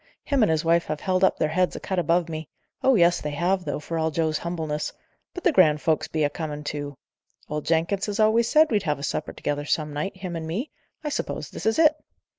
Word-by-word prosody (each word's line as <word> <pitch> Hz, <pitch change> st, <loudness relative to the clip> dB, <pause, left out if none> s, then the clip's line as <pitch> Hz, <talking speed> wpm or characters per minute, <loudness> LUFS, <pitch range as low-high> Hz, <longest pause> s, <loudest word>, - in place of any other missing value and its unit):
Him 280 Hz, -3 st, +1 dB
and 215 Hz, -, +4 dB
his 160 Hz, +1 st, +1 dB
wife 170 Hz, +1 st, +3 dB
have 155 Hz, -1 st, -3 dB
held 185 Hz, 0 st, +1 dB
up 190 Hz, -, +4 dB
their 155 Hz, -, +1 dB
heads 180 Hz, +3 st, +1 dB
a -, -, -4 dB
cut 190 Hz, -2 st, -2 dB
above 170 Hz, +1 st, +2 dB
me 155 Hz, -2 st, -6 dB, 0.3 s
oh 265 Hz, -1 st, +4 dB
yes, 175 Hz, -2 st, +4 dB
they 150 Hz, -, -3 dB
have, 180 Hz, +5 st, 0 dB
though, -, -, -2 dB
for 165 Hz, +2 st, -4 dB
all 160 Hz, 0 st, +1 dB
Joe's 160 Hz, 0 st, 0 dB
humbleness 160 Hz, -3 st, -3 dB, 0.4 s
but 360 Hz, -, -8 dB
the 355 Hz, -, +4 dB
grand 155 Hz, -, +5 dB
folks 160 Hz, +1 st, +1 dB
be 155 Hz, -1 st, -1 dB
a 145 Hz, -, +3 dB
coming 150 Hz, -2 st, -5 dB
to. 145 Hz, -2 st, -5 dB, 0.5 s
Old 150 Hz, 0 st, -4 dB
Jenkins 170 Hz, +5 st, +1 dB
has 205 Hz, +1 st, -3 dB
always 220 Hz, +2 st, +4 dB
said 310 Hz, -1 st, +5 dB
we'd 210 Hz, -2 st, +2 dB
have 150 Hz, -6 st, -1 dB
a 140 Hz, -, -9 dB
supper 150 Hz, -, -2 dB
together 145 Hz, 0 st, -3 dB
some 150 Hz, 0 st, -1 dB
night, 190 Hz, +6 st, -3 dB
him 185 Hz, -2 st, -5 dB
and 160 Hz, -1 st, -4 dB
me; 210 Hz, -, -3 dB, 0.3 s
I 300 Hz, -, -2 dB
suppose -, -, -4 dB
this -, -, -4 dB
is 220 Hz, -, +2 dB
it. 315 Hz, -2 st, +6 dB
165 Hz, 240 wpm, -25 LUFS, 150-195 Hz, 0.5 s, it